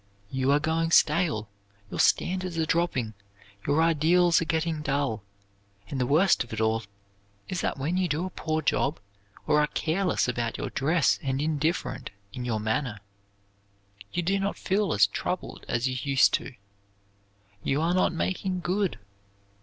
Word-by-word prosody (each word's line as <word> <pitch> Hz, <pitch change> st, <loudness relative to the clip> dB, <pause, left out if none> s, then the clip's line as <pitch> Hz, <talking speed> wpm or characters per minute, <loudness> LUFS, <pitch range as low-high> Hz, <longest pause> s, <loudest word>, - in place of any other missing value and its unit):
You 130 Hz, 0 st, 0 dB
are 145 Hz, -, +4 dB
going 165 Hz, +1 st, 0 dB
stale, 150 Hz, -, +3 dB, 0.4 s
your -, -, -5 dB
standards 185 Hz, -1 st, +1 dB
are 160 Hz, -, +1 dB
dropping, 155 Hz, -9 st, 0 dB, 0.5 s
your 150 Hz, +3 st, +3 dB
ideals 165 Hz, +2 st, +4 dB
are -, -, -1 dB
getting 160 Hz, -1 st, -1 dB
dull, 140 Hz, -7 st, -1 dB, 0.7 s
and 135 Hz, -, -2 dB
the 125 Hz, -, +1 dB
worst 165 Hz, +5 st, +4 dB
of 120 Hz, -, -16 dB
it 110 Hz, -, -4 dB
all 110 Hz, 0 st, +1 dB, 0.7 s
is 180 Hz, -, -3 dB
that -, -, -1 dB
when 155 Hz, +7 st, -1 dB
you 185 Hz, -1 st, +1 dB
do 160 Hz, +3 st, -1 dB
a 185 Hz, -, -5 dB
poor 155 Hz, -2 st, -2 dB
job, 140 Hz, +1 st, +1 dB, 0.5 s
or 150 Hz, 0 st, +4 dB
are 150 Hz, -, +2 dB
careless 175 Hz, +3 st, 0 dB
about 120 Hz, -2 st, -2 dB
your -, -, -4 dB
dress 155 Hz, +4 st, +2 dB
and 135 Hz, -1 st, -1 dB
indifferent 155 Hz, -3 st, -1 dB, 0.2 s
in 125 Hz, -, -5 dB
your 115 Hz, -3 st, -1 dB
manner, 110 Hz, +2 st, -1 dB, 1.1 s
you 175 Hz, -, -1 dB
do 195 Hz, +3 st, +1 dB
not 200 Hz, +1 st, -2 dB
feel 195 Hz, -2 st, 0 dB
as 105 Hz, -5 st, +5 dB
troubled -, -, -4 dB
as 120 Hz, +2 st, 0 dB
you 130 Hz, -, -2 dB
used 135 Hz, -1 st, +4 dB
to. 135 Hz, -, -2 dB, 1.1 s
You 135 Hz, +7 st, 0 dB
are 165 Hz, +3 st, +1 dB
not 185 Hz, -, +3 dB
making 185 Hz, +2 st, -2 dB
good. 190 Hz, -, 0 dB
155 Hz, 160 wpm, -27 LUFS, 130-175 Hz, 1.1 s, as